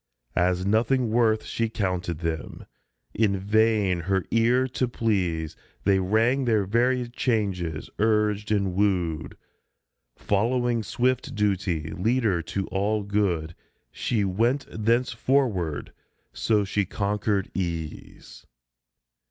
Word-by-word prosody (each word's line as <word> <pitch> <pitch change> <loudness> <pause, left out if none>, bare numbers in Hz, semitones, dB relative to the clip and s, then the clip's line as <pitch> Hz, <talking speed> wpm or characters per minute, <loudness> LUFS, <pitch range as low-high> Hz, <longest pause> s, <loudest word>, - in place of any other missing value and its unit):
As 90 +1 +1
nothing 115 +3 +2
worth 110 -2 +3
She 115 -1 -1
counted 90 -6 -2
them; 80 -2 -4 0.5
in 100 -2 +2
vain 105 -2 +2
her 95 +2 0
ear 120 +3 +3
to 125 0 -1
please 90 -9 -1 0.3
They 95 -1 +3
rang 115 +8 +2
their 110 -4 +2
varied 120 +3 +1
changes, 95 - -1
urged 105 -1 +1
and 100 -3 +1
wooed, 90 -5 0 0.8
Following 120 +3 +1
swift 125 +4 -1
Duty, 95 -6 0
leader 110 -2 +1
to 95 +4 -3
all 100 +3 0
good, 95 -6 0 0.4
She 110 -5 -1
went 115 +9 +1
thenceforward; 115 - 0 0.4
so 105 -2 +1
she 100 +1 0
conquered 100 0 -1
Ease. 85 -4 -6
105 Hz, 105 wpm, -25 LUFS, 90-115 Hz, 0.8 s, worth